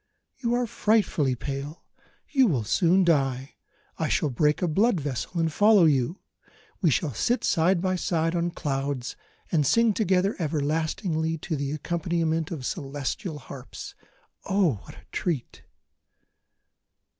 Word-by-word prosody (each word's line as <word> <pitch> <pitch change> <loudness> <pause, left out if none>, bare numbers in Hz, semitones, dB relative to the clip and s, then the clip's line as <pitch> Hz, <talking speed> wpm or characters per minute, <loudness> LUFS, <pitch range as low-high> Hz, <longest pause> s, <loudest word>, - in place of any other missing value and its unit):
_ - - -29
"You 235 0 +2
are 245 0 +1
frightfully 205 - +1
pale, 140 +5 -6 0.4
you 265 -4 +4
will 135 - +1
soon 175 - +3
die; 135 -5 +1 0.5
I - - +1
shall 150 - +1
break 150 +7 +1
a - - +2
blood 195 +5 +2
vessel, 145 +5 -3
and 165 -2 0
follow 205 -2 +6
you; 145 +3 +1 0.6
we 175 - +4
shall 145 0 0
sit 240 - 0
side 175 +1 +3
by 185 0 +1
side 165 -1 0
on 170 0 0
clouds, 140 -6 -3 0.4
and 155 -4 +3
sing 230 - +3
together 195 -1 +1
everlastingly 160 +2 -1
to 145 -5 -2
accompaniment 165 -1 -1
of 150 -7 -5
celestial 145 +5 -4
harps. 135 -2 -9 0.5
Oh, 185 - +2
what - - -12
a 95 - -16
treat!" 155 -9 -3
160 Hz, 135 wpm, -26 LUFS, 140-185 Hz, 0.6 s, follow